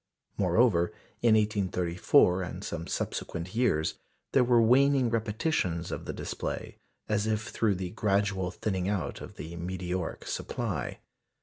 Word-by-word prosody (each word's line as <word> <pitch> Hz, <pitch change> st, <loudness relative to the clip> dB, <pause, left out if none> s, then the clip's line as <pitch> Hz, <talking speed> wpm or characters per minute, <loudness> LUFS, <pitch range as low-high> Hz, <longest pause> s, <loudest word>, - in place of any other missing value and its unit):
Moreover, 90 Hz, -1 st, +3 dB, 0.3 s
in 115 Hz, -2 st, +5 dB
1834 95 Hz, -4 st, +3 dB
and 90 Hz, +1 st, -5 dB
some 85 Hz, -3 st, -4 dB
subsequent 85 Hz, +2 st, -3 dB
years, 110 Hz, -10 st, +1 dB, 0.3 s
there 130 Hz, -, +5 dB
were 120 Hz, -1 st, +4 dB
waning 130 Hz, +2 st, +4 dB
repetitions 105 Hz, -, 0 dB
of -, -, -5 dB
the -, -, -3 dB
display, -, -, -5 dB, 0.3 s
as 105 Hz, 0 st, +1 dB
if 110 Hz, +1 st, -1 dB
through 105 Hz, -3 st, +1 dB
the 90 Hz, -1 st, -4 dB
gradual 100 Hz, -3 st, +1 dB
thinning 95 Hz, 0 st, -2 dB
out 100 Hz, -4 st, -2 dB
of -, -, -9 dB
the 80 Hz, +3 st, -7 dB
meteoric 90 Hz, 0 st, -3 dB
supply. 100 Hz, -, -3 dB
100 Hz, 130 wpm, -29 LUFS, 90-110 Hz, 0.3 s, in